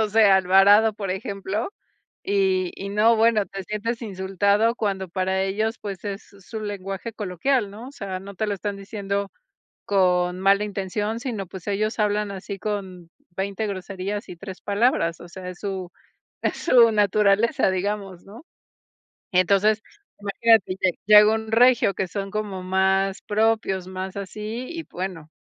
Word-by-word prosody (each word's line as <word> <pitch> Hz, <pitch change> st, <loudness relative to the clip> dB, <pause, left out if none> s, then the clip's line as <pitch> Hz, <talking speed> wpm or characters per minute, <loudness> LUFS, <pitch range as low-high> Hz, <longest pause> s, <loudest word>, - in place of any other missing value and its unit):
no 220 Hz, -, +2 dB
sé, 220 Hz, +1 st, +4 dB
a 195 Hz, -1 st, +6 dB
Alvarado, 195 Hz, +4 st, +5 dB
por 205 Hz, -2 st, -5 dB
ejemplo, 200 Hz, -, -3 dB, 0.5 s
y 190 Hz, -2 st, +1 dB
y 195 Hz, -, -6 dB
no, 220 Hz, +3 st, +4 dB
bueno, 220 Hz, -2 st, +3 dB
te 195 Hz, -1 st, -7 dB
sientes 215 Hz, +4 st, -3 dB
insultado 200 Hz, +2 st, +1 dB
cuando 195 Hz, -4 st, -2 dB
para 190 Hz, +2 st, 0 dB
ellos, 215 Hz, +4 st, -1 dB
pues, 200 Hz, -2 st, -6 dB
es 200 Hz, -1 st, -4 dB, 0.3 s
su 220 Hz, -, -5 dB
lenguaje 200 Hz, +1 st, -5 dB
coloquial, 210 Hz, +4 st, 0 dB
¿no? 220 Hz, +5 st, -9 dB
O -, -, -13 dB
sea, 195 Hz, -7 st, -5 dB
no 200 Hz, +1 st, -10 dB
te 215 Hz, -, -1 dB
lo 205 Hz, -, -1 dB
están 200 Hz, +1 st, -4 dB
diciendo 200 Hz, 0 st, -4 dB, 0.5 s
con 180 Hz, -2 st, +2 dB
mala 200 Hz, +2 st, +3 dB
intención, 205 Hz, +2 st, -3 dB
sino 225 Hz, -6 st, -4 dB
pues, 185 Hz, 0 st, -10 dB
ellos 215 Hz, +2 st, -1 dB
hablan 210 Hz, -1 st, +1 dB
así 195 Hz, 0 st, -7 dB
con 190 Hz, -4 st, -5 dB, 0.3 s
20, 200 Hz, +3 st, -2 dB
groserías 195 Hz, +1 st, -5 dB
y 180 Hz, -, -7 dB
3, 190 Hz, +2 st, -9 dB
palabras, 200 Hz, -6 st, +1 dB
o 175 Hz, -, -11 dB
sea, 180 Hz, +1 st, -8 dB
es 180 Hz, -, -9 dB
su 190 Hz, -3 st, -4 dB, 0.5 s
es -, -, 0 dB
su 240 Hz, -7 st, +5 dB
naturaleza, 210 Hz, +3 st, +3 dB
digamos, 195 Hz, -1 st, -3 dB
¿no? 225 Hz, +10 st, -13 dB, 0.9 s
Entonces, 200 Hz, +4 st, +3 dB, 0.4 s
imagínate 205 Hz, -1 st, +3 dB
lle 185 Hz, -, +3 dB
llega 210 Hz, +1 st, +8 dB
un 220 Hz, 0 st, -4 dB
regio, 240 Hz, -2 st, +5 dB
que 190 Hz, -, -1 dB
son 195 Hz, +2 st, -4 dB
como 205 Hz, -3 st, -4 dB
más 190 Hz, +1 st, +1 dB
propios, 210 Hz, -3 st, 0 dB
más 185 Hz, 0 st, -5 dB
así 215 Hz, +5 st, -5 dB
y 335 Hz, -1 st, -5 dB
bueno, 180 Hz, -4 st, -6 dB
200 Hz, 160 wpm, -24 LUFS, 190-215 Hz, 0.9 s, llega